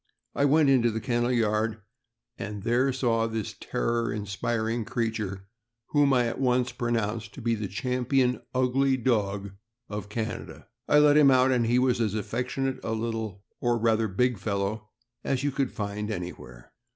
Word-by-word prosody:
I 140 - +2
went 150 +1 +4
into 120 -3 +4
the 110 0 -2
kennel 120 +1 0
yard, 110 -2 +1 0.6
and 105 -2 -6
there 125 +4 +2
saw 115 -3 +1
this 110 -2 -4
terror 115 0 -1
inspiring 110 +3 -2
creature, 105 -4 -3 0.4
whom 145 -2 +3
I 125 -2 +3
at 115 - -3
once 125 -1 +2
pronounced 115 -3 -2
to - - -8
be 115 0 +2
the 105 -2 -2
champion 125 +4 0
ugly 130 +1 +2
dog 100 -5 0 0.4
of 105 -1 -5
Can 110 +1 -3
ada. - - -12 0.2
I 150 - +5
let 150 0 +6
him 145 -2 +7
out, 130 0 +5
and 120 -3 +2
he 120 +2 +3
was 125 -2 +2
as 110 -2 0
affectionate 125 +5 -2
a 110 - -2
little, 110 -3 -3 0.2
or 120 -1 +1
rather 115 -1 +2
big, 120 +3 0
fellow 105 +1 -2 0.3
as 135 -1 -1
you 145 - +1
could 135 -1 -1
find 105 0 -4
anywhere. 85 - -7
115 Hz, 165 wpm, -27 LUFS, 105-125 Hz, 0.6 s, him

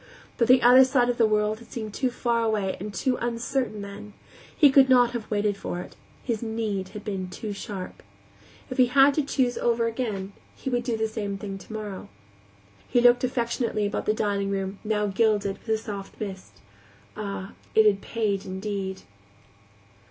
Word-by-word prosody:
But 235 - +2
the 250 0 +6
other 250 +2 +8
side 255 -2 +2
of 245 - -1
the 225 - +5
world 215 0 +1
had 235 -1 -16
seemed 215 -3 -5
too 260 +2 0
far 235 -1 0
away 215 -4 0
and 205 +3 -5
too 250 +5 0
uncertain 235 -2 -2
then; 200 +1 -9 0.4
he 290 -3 +7
could 265 -1 +6
not 245 -2 +5
have 235 -3 -5
waited 205 -1 +1
for 175 - -4
it; - - -9 0.3
his 230 -4 -2
need 220 -4 -2
had 210 - -9
been 190 -3 -3
too 210 +3 -5
sharp. 195 -2 -7 0.7
If 255 - -4
he 250 - +6
had 275 +3 +5
to 305 - +1
choose 260 -3 0
over 235 -1 +1
again, 215 -4 -3 0.2
he 265 - -5
would 245 0 0
do 235 -3 -1
the 220 0 0
same 205 -3 -4
thing 195 -1 -6
tomorrow. 210 -2 -7 0.8
He 245 - +2
looked 245 +1 +5
affectionately 235 -3 -1
about 205 - -3
the 215 - +4
dining 200 -2 0
room, 195 0 -3
now 210 -1 0
gilded 205 -1 +1
with - - -14
a 220 - +3
soft 205 -3 -8
mist. 190 - -7 0.5
Ah, 200 -2 -5 0.2
it 220 - +6
had 200 -2 +4
paid 210 -4 -1
indeed! 190 0 -4
215 Hz, 180 wpm, -26 LUFS, 200-240 Hz, 0.8 s, other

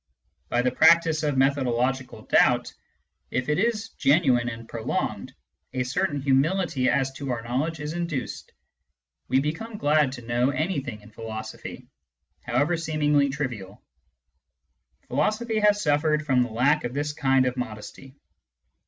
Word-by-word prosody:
By 120 0 +1
the 125 - +2
practice 160 +2 +5
of 145 -3 0
methodological 130 -1 0
doubt, - - +3 0.6
if 125 +2 -2
it 150 - +1
is 225 +1 0
genuine 135 - +2
and 115 -1 -8
prolonged, 115 -1 -3 0.4
a 130 - 0
certain 145 +4 -1
humility 140 +1 +1
as 135 -2 +1
to 135 +1 -7
our 120 -3 -2
knowledge 140 +7 -2
is 150 +1 -4
induced: 170 -7 -4 0.8
we 130 +2 +3
become 165 +11 -4
glad 150 -4 +2
to 120 -3 -9
know 120 +2 +1
anything 140 - -2
in 105 +1 -16
philosophy, 110 0 -8 0.5
however 145 +8 +1
seemingly 150 -3 +1
trivial. 120 -9 -5 1.3
Philosophy 220 +1 0
has 210 -1 +3
suffered 150 0 +1
from 130 -4 +3
the 125 - 0
lack 135 +7 +2
of 120 +2 -4
this 145 +1 -2
kind 135 -2 +2
of 125 0 -1
modesty. 125 +3 -7
140 Hz, 135 wpm, -25 LUFS, 125-155 Hz, 1.3 s, practice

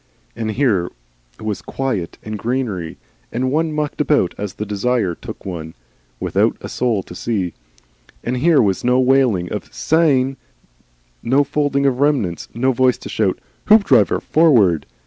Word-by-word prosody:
And 110 - -3
here 110 -7 +1 0.5
was 105 -3 -3
quiet 125 -11 -3
and 110 0 -5
greenery, 110 -8 -3 0.3
and 130 +1 -1
one 160 +2 +1
mucked 150 -1 -2
about 145 -12 +2
as 100 -1 -5
the 105 - -4
desire 105 -1 0
took - - -10
one, 80 -4 -6 0.4
without - - +1
a - - -7
soul 115 -6 0
to - - -11
see, 95 -2 -2 0.7
and 125 +1 -2
here 155 0 +4
was 95 -3 0
no 125 +1 +3
wailing 125 -9 +2
of - - -6
"Sayn," 135 -5 +2 0.8
no 135 +4 +3
folding 145 -1 0
of 130 -2 +1
remnants, 135 - 0
no 130 +3 +2
voice 130 -1 +2
to - - -9
shout, - - 0 0.3
"Hoopdriver, 210 -1 +5
forward!" 115 - +3
125 Hz, 145 wpm, -19 LUFS, 100-140 Hz, 0.8 s, Hoopdriver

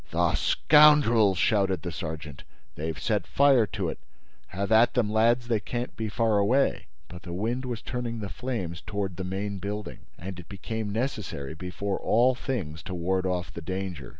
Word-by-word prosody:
"The - - +1
scoundrels!" 145 - +5
shouted 95 -2 +2
the 90 - -4
sergeant. 80 -3 -6 0.3
"They've 80 0 -4
set - - -1
fire 135 -6 +4
to - - -3
it. - - -6 0.5
Have 100 +3 -4
at 110 +2 +5
them, 115 -4 +1
lads! 120 +2 +3
They 115 -3 +1
can't 120 +5 -4
be 110 -1 -3
far 110 -1 +2
away!" 125 +7 +2 0.2
But 90 0 -10
the 85 -1 -7
wind 115 +8 -2
was 120 -3 -4
turning 120 -2 -4
the 105 - -4
flames 95 - -4
toward 100 +2 -3
the 95 - -3
main 95 +2 -3
building; 100 -1 -5 0.2
and 90 +2 -7
it 90 - -12
became 110 +2 -4
necessary, 105 - -3
before 90 +4 -4
all 120 +4 +3
things, 100 - -4
to 95 - -5
ward 95 +2 0
off 90 -1 -2
the 85 - -7
danger. 95 -2 -5
100 Hz, 180 wpm, -27 LUFS, 90-115 Hz, 0.5 s, scoundrels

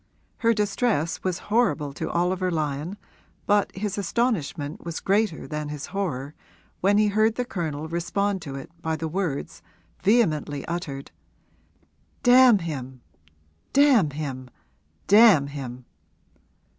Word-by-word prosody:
Her 230 - +3
distress 205 - 0
was 185 -2 -1 0.2
horrible 165 - +2
to - - -4
Oliver 180 +2 0
Lyon 155 +3 -2 0.5
but 205 -1 +2
his 205 +1 -3
astonishment 175 - -1
was 170 -1 -4
greater 200 -4 0
than 150 -1 -4
his 150 0 -5
horror 150 -8 -3 0.5
when 200 +2 +3
he 210 0 +4
heard 215 +2 +2
the 250 - -2
Colonel 160 - -4
respond 190 +4 -1
to 140 -3 -7
it 135 +3 -8
by 160 -1 -1
the 160 +1 -4
words, 165 -4 -3 0.4
vehemently 155 - +1
uttered, 155 -5 -5 1.1
'Damn 250 -2 +7
him, 130 -8 -6 0.7
damn 270 - +5
him, 135 -3 -6 0.6
damn 205 -8 +7
him!' 130 -3 -7
170 Hz, 120 wpm, -25 LUFS, 145-205 Hz, 1.1 s, Damn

